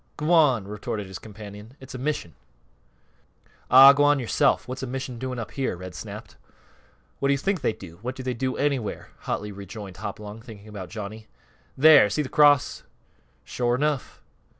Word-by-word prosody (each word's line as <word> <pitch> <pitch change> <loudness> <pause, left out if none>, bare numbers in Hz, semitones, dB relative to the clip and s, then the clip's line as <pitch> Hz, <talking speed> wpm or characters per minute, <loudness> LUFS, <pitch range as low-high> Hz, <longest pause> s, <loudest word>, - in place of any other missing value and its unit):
"G'wan!" 150 - +3
retorted 105 0 -5
his 95 -1 -8
companion. 105 +3 -11
"It's 130 -1 -11
a 130 - -6
mission." 130 - -3 1.4
"Ah, 135 +2 +10
g'wan 145 +1 +4
yorself! 125 -4 +1
What's 130 +1 -6
a 130 - -4
mission 130 -1 -5
doing 130 0 -4
up 115 -2 -6
here?" 135 -9 -2
Red 90 0 -8
snapped. - - -9 0.8
"What 140 - +1
do 140 - +4
you - - +1
think 190 +3 -1
they - - +1
do? 85 -5 -12
What 125 +3 -4
do 130 - -7
they 125 0 -2
do 130 +2 -2
anywhere?" 135 -7 -2 0.2
hotly 105 0 -2
rejoined 100 0 -9
Hopalong, 105 +1 -7
thinking 110 -3 -12
about 100 -4 -8
Johnny. 110 +1 -8 0.5
"There! 145 -6 +7
See 150 +9 -1
th' 130 - -8
cross?" 145 -3 +4 0.6
"Shore 120 -1 0
enough!" 145 0 -2
125 Hz, 170 wpm, -25 LUFS, 105-135 Hz, 1.4 s, Ah